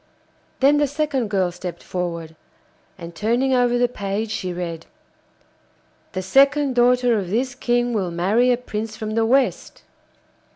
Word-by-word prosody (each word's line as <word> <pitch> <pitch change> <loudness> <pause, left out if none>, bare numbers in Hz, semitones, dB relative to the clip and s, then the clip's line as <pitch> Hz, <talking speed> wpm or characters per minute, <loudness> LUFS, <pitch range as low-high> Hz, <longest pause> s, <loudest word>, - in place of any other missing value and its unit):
Then 280 +2 +5
the 290 0 +2
second 285 -5 -1
girl 190 -3 0
stepped 175 -1 -7
forward, 170 -3 -4 0.6
and 170 -2 -9
turning 240 +8 0
over 245 -1 +2
the 245 0 +3
page 210 -1 -4
she 185 -4 -3
read: 170 -2 -5 1.3
'The 185 - -3
second 275 +6 +3
daughter 245 -1 +3
of 185 -3 -5
this 245 +5 -1
King 245 -1 0
will 195 -5 -1
marry 200 +9 +2
a 245 - +2
prince 220 -2 -5
from 215 -1 -4
the 225 0 +1
West. 265 +2 0
225 Hz, 150 wpm, -21 LUFS, 185-250 Hz, 1.3 s, Then